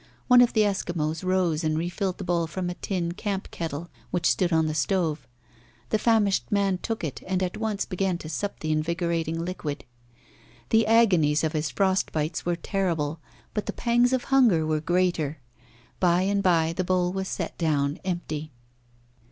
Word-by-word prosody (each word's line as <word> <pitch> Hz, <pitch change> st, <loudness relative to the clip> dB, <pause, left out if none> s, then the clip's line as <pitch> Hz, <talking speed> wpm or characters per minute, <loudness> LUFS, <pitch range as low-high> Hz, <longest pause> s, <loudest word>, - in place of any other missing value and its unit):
One 250 Hz, -1 st, +8 dB
of 245 Hz, -, +4 dB
the 220 Hz, -, +4 dB
Eskimos 175 Hz, -6 st, -1 dB
rose 180 Hz, -3 st, +1 dB
and 155 Hz, 0 st, +1 dB
re 165 Hz, +2 st, -1 dB
filled 185 Hz, +1 st, -2 dB
the -, -, -6 dB
bowl 170 Hz, -2 st, 0 dB
from 175 Hz, +2 st, -3 dB
a -, -, -3 dB
tin 175 Hz, -2 st, -2 dB
camp 195 Hz, +1 st, -4 dB
kettle 165 Hz, 0 st, -4 dB, 0.2 s
which 175 Hz, -2 st, -2 dB
stood 180 Hz, +1 st, +2 dB
on 160 Hz, -1 st, +3 dB
the 155 Hz, -, -1 dB
stove. 160 Hz, +1 st, 0 dB, 0.6 s
The 215 Hz, -, +1 dB
famished 215 Hz, -4 st, +2 dB
man 200 Hz, -2 st, +1 dB
took 225 Hz, -1 st, -4 dB
it 145 Hz, -5 st, -4 dB
and 185 Hz, 0 st, 0 dB
at 180 Hz, -, -2 dB
once 215 Hz, -2 st, -2 dB
began 185 Hz, -2 st, -1 dB
to 160 Hz, -, -9 dB
sup 200 Hz, +6 st, -4 dB
the 155 Hz, -, -1 dB
invigorating 165 Hz, +1 st, -1 dB
liquid. 155 Hz, -5 st, -5 dB, 0.8 s
The 225 Hz, -1 st, +4 dB
agonies 180 Hz, -10 st, +4 dB
of 160 Hz, 0 st, 0 dB
his 155 Hz, 0 st, -1 dB
frost 190 Hz, -1 st, +1 dB
bites 155 Hz, +2 st, -2 dB
were 175 Hz, -, +2 dB
terrible, 165 Hz, -4 st, -1 dB, 0.3 s
but 210 Hz, -, -3 dB
the -, -, -2 dB
pangs 240 Hz, +1 st, +2 dB
of 260 Hz, -1 st, +1 dB
hunger 235 Hz, -13 st, +4 dB
were 155 Hz, -1 st, 0 dB
greater. 175 Hz, -3 st, 0 dB, 0.6 s
By 180 Hz, 0 st, +3 dB
and 200 Hz, +1 st, +1 dB
by 165 Hz, -3 st, +3 dB
the 185 Hz, +2 st, -1 dB
bowl 180 Hz, 0 st, +1 dB
was 190 Hz, 0 st, -3 dB
set -, -, -4 dB
down 145 Hz, -3 st, +1 dB
empty. 155 Hz, -4 st, -4 dB
175 Hz, 180 wpm, -26 LUFS, 160-195 Hz, 0.8 s, One